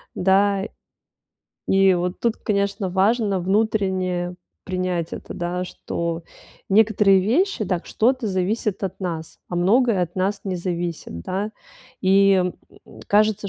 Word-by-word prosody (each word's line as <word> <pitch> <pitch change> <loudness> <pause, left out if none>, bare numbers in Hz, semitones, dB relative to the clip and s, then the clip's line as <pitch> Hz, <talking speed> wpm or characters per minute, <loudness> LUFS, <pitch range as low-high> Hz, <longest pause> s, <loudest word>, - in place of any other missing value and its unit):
да. 195 +1 +3 1.1
И 195 0 +5
вот 180 +1 -2
тут, 230 -1 +1
конечно, 200 -2 -1
важно 200 +2 +2
внутренне 185 -2 0 0.3
принять 185 -3 -2
это, - - -7
да, 175 +1 -2
что 170 -2 -4 0.5
некоторые 205 -2 +5
вещи, 255 - +1
да, 180 -3 -1
что-то 250 0 +1
зависит 200 +2 -1
от 190 - -5
нас, 165 -3 -5
а 175 - -4
многое 215 +3 +3
от 175 0 -4
нас 195 +2 -1
не 190 -2 -2
зависит, 175 - -4
да. 195 - -3 0.5
И 190 -1 +4 0.6
кажется, 210 0 +2
190 Hz, 120 wpm, -22 LUFS, 180-210 Hz, 1.1 s, И